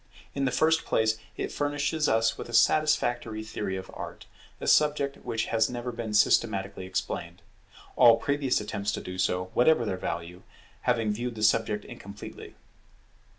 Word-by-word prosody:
In 140 -1 -1
the 130 - +1
first 160 +3 +3
place, 110 0 +1 0.2
it - - -3
furnishes 145 +1 0
us 115 0 +2
with - - -8
a - - -9
satisfactory 120 -7 +2
theory 105 -3 -4
of 95 - -8
Art; - - -8 0.3
a - - -6
subject 145 -2 +3
which 115 0 -3
has 115 -1 +3
never 125 0 -4
been 115 -2 -4
systematically 100 -3 +2
explained; 95 -2 -4 0.5
all 115 -2 +7
previous 140 -2 0
attempts 105 -1 -3
to - - -3
do 90 0 -7
so, 90 0 0
whatever 125 -1 +4
their 95 -3 -2
value, 85 0 -5 0.5
having 115 -3 +2
viewed 120 +2 -4
the 110 - -4
subject 110 -1 +2
incompletely. 100 +1 -10
115 Hz, 155 wpm, -28 LUFS, 100-125 Hz, 0.5 s, all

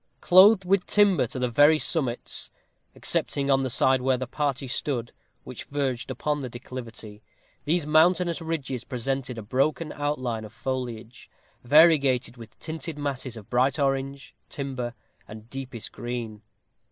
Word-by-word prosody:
Clothed 190 +2 +6
with 190 0 +2
timber 205 -3 +4
to 145 - -7
the 125 0 0
very 145 +6 +5
summits, 135 -7 -2 0.5
excepting 140 0 -1
on 135 0 +4
the 130 - -1
side 130 +2 +3
where 130 0 +2
the 130 - -3
party 140 +1 -2
stood, 125 -2 -2 0.3
which - - -8
verged 135 -4 -2
upon 145 +3 -2
the 130 -3 -5
declivity, 115 -3 -9 0.4
these 160 +1 +1
mountainous 170 +3 +3
ridges 140 -7 -3
presented 125 0 -3
a 110 - -6
broken 140 +7 0
outline 130 -6 -2
of 105 - -10
foliage, 120 -2 -5 0.3
variegated 140 -3 +4
with 115 -3 -13
tinted 160 -1 -6
masses 135 -4 -4
of 105 - -11
bright 130 +2 +2
orange, 135 -1 -2 0.2
timber, 130 -4 -5 0.3
and 110 +2 -12
deepest 130 -4 -6
green. 120 -3 -5
135 Hz, 140 wpm, -26 LUFS, 120-150 Hz, 0.5 s, Clothed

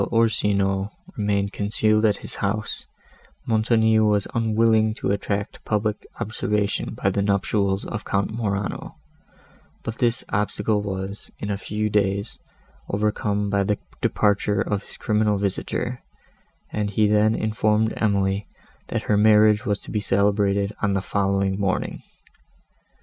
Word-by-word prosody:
While - - -1
Orsino 100 -3 +1 0.3
remained 100 -1 0
concealed 110 +1 +2
in 105 - +4
his - - -5
house, 105 +2 -2 0.6
Montoni 110 0 +3
was 105 -2 +2
unwilling 110 -1 +2
to 100 - -1
attract 100 0 -3
public 105 0 -1
observation 105 -1 -1
by 95 - 0
the 100 - 0
nuptials 100 0 +1
of 115 -2 -5
Count 100 +1 -1
Morano; 100 -3 -3 0.9
but 115 0 -5
this 120 -2 +1
obstacle 105 +1 0
was, 100 0 -5
in 105 - -4
a - - 0
few 105 +2 -2
days, 100 0 0 0.5
overcome 105 0 0
by 100 0 +2
the 105 +1 0 0.2
departure 105 -1 +2
of 100 -1 -1
his - - -14
criminal 105 -1 +1
visitor, 100 +5 -2 0.7
and 105 -1 -1
he 105 +1 +2
then 105 +1 +3
informed 110 0 +1
Emily, 100 -1 +1 0.4
that - - -2
her 105 - +2
marriage 105 0 +5
was 105 -1 +1
to - - -9
be 105 - 0
celebrated 100 0 +1
on 100 -2 +1
the 95 - +1
following 100 -1 0
morning. 100 -2 -1
105 Hz, 135 wpm, -23 LUFS, 100-110 Hz, 0.9 s, marriage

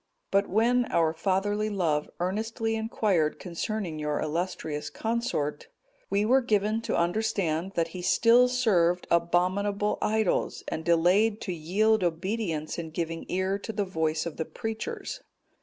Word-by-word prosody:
But 200 +1 +2
when 240 +4 +3
our 160 -6 +1
fatherly 205 +5 0
love 165 -7 0
earnestly 225 +5 -1
inquired 210 -8 0
concerning 180 -1 -4
your 150 -1 -1
illustrious 155 -2 -3
consort, 225 -11 -2 0.4
we 200 +2 +1
were 260 +4 +4
given 215 -1 +1
to - - +1
understand, 175 -1 0
that 165 -1 +1
he 180 +2 -7
still 235 +7 +5
served 185 -9 +2
abominable 185 +5 +1
idols, 220 -3 0
and 160 - -3
delayed 180 +6 +3
to 185 - -3
yield 195 +6 +2
obedience 175 -2 -2
in 165 -1 -5
giving 165 0 -4
ear 190 +2 0
to 220 - -5
the 205 -2 -1
voice 160 -4 -1
of 170 - -5
the 160 - -2
preachers. 220 +7 -5
190 Hz, 140 wpm, -28 LUFS, 165-220 Hz, 0.4 s, still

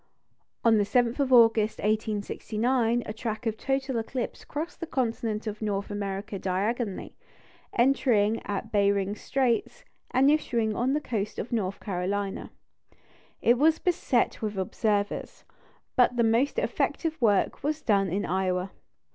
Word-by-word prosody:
On 225 -2 +5
the - - +3
7th 235 +5 +1
of 275 -2 +1
August, 225 -3 +5
1869, 220 +3 0
a 215 - -5
track 220 0 -4
of 220 -1 0
total 270 +1 -1
eclipse 240 +2 -4
crossed 315 +4 -5
the 335 - -5
continent 230 -5 -2
of 215 0 -5
North 200 -1 -2
America 200 0 -4
diagonally, 200 +3 -2 0.6
entering 235 -4 +3
at 205 +2 -4
Behring's 200 0 +1
Straits, 270 - -1 0.2
and 270 +3 +4
issuing 235 -8 0
on 255 +3 +1
the 300 - 0
coast 210 -7 -3
of 240 - -5
North 200 -5 -1
Carolina. 195 +1 -3 0.9
It 240 +1 +4
was 315 +2 +4
beset 300 -9 0
with 210 -2 -3
observers; 205 +2 -1 0.5
but 245 -1 +4
the 235 - +4
most 235 - +2
effective 325 - -1
work 205 -4 +2
was 305 +2 -2
done 200 -3 +2
in 195 +4 -1
Iowa. 185 +1 -1
225 Hz, 140 wpm, -27 LUFS, 205-250 Hz, 0.9 s, On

